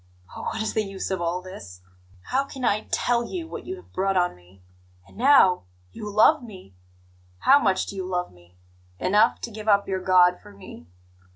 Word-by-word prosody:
Oh, - - -7
what - - -3
is 220 - -3
the 220 - +1
use 195 -1 -5
of 190 -2 -2
all 175 +2 -2
this! 100 - -11 0.5
How 270 +2 +1
can 265 -2 -6
I 215 -1 0
TELL 240 -1 0
you 335 +4 -6
what - - -8
you 375 - -4
have 370 - -17
brought 195 0 0
on 180 0 +1
me? 90 +1 -22 0.4
And - - -19
now 230 - +4 0.3
you 210 - -7
love 220 +9 +4
me! 190 - -12 0.7
How 280 +2 +6
much 190 -8 +1
do - - -8
you 190 -1 -4
love 180 - -3
me? 90 0 -22 0.4
Enough 205 +3 +2
to 235 - -6
give 215 0 -9
up 200 -1 +3
your 190 -1 -2
God 180 -1 +4
for 205 -1 -15
me? 185 - -13
195 Hz, 200 wpm, -24 LUFS, 180-220 Hz, 0.7 s, How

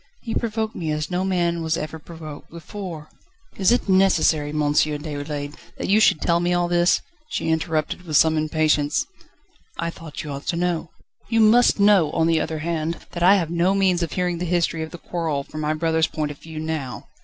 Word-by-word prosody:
He 225 - -4
provoked 220 -1 -2
me 165 -3 -3
as 155 +3 -3
no 180 +1 0
man 175 -3 0
was 160 0 0
ever 155 +1 -5
provoked 155 -2 -10
before 170 -2 -8 0.3
..." 365 - -35
"Is 195 +2 +3
it 245 - +1
necessary, 185 -6 +3
M. 150 +1 -3
Déroulède, 145 -1 -1 0.2
that - - -4
you 205 +2 +5
should 215 - +4
tell 170 0 +2
me 175 +1 +1
all 175 0 +1
this?" 175 0 +3 0.3
she - - -2
interrupted 160 -1 -1
him 180 - -18
with 155 -2 +2
some 160 0 +4
impatience. 155 - +1 0.7
"I 170 0 -2
thought 165 -1 -8
you 150 - -6
ought 140 +1 -7
to - - 0
know." 175 -1 -1 0.4
"You 225 -1 +2
must 225 +1 +5
know, 200 -6 +5
on 165 - +2
the 165 -1 +2
other 160 +1 -3
hand, 165 0 -2
that 170 - -6
I 185 +3 +7
have 170 -5 -1
no 175 +3 +2
means 190 -3 +2
of 170 - -2
hearing 180 -2 -1
the 180 - -2
history 170 -2 0
of 160 - -4
the 175 - -9
quarrel 160 -5 -3
from 155 +2 -7
my 155 +1 0
brother's 160 0 +1
point 150 -3 -3
of 145 - -11
view 160 -1 -8
now." 155 -5 -4
165 Hz, 210 wpm, -23 LUFS, 155-180 Hz, 0.7 s, I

